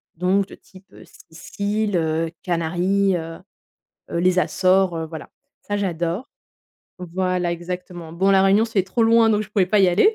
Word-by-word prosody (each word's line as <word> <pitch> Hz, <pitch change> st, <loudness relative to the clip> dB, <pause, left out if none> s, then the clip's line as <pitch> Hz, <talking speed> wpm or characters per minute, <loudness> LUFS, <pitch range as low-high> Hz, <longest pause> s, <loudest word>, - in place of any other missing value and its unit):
donc 185 Hz, +3 st, +1 dB
de -, -, -12 dB
type 190 Hz, 0 st, -19 dB
Sicile, 205 Hz, +5 st, -4 dB
heu, 160 Hz, 0 st, -1 dB
Canaries, 180 Hz, +3 st, 0 dB
heu, 165 Hz, 0 st, -7 dB, 0.7 s
les 180 Hz, +2 st, +1 dB
Açores, 185 Hz, 0 st, +2 dB
heu, 160 Hz, 0 st, -3 dB
voilà 160 Hz, -1 st, -9 dB, 0.3 s
ça 205 Hz, -, -3 dB
j'adore. 175 Hz, -, -2 dB, 0.7 s
Voilà, 180 Hz, 0 st, -2 dB
exactement. 175 Hz, -1 st, -7 dB
Bon, 190 Hz, +3 st, +2 dB
la 195 Hz, -, +5 dB
Réunion 195 Hz, +3 st, +4 dB
c'est 215 Hz, -4 st, 0 dB
trop 190 Hz, +5 st, 0 dB
loin, 225 Hz, 0 st, +5 dB
donc 210 Hz, -1 st, +2 dB
je 215 Hz, -, -8 dB
pouvais 195 Hz, -3 st, +2 dB
pas 205 Hz, +2 st, +2 dB
y 190 Hz, -, +5 dB
aller. 200 Hz, -, +4 dB
185 Hz, 160 wpm, -21 LUFS, 170-200 Hz, 0.7 s, la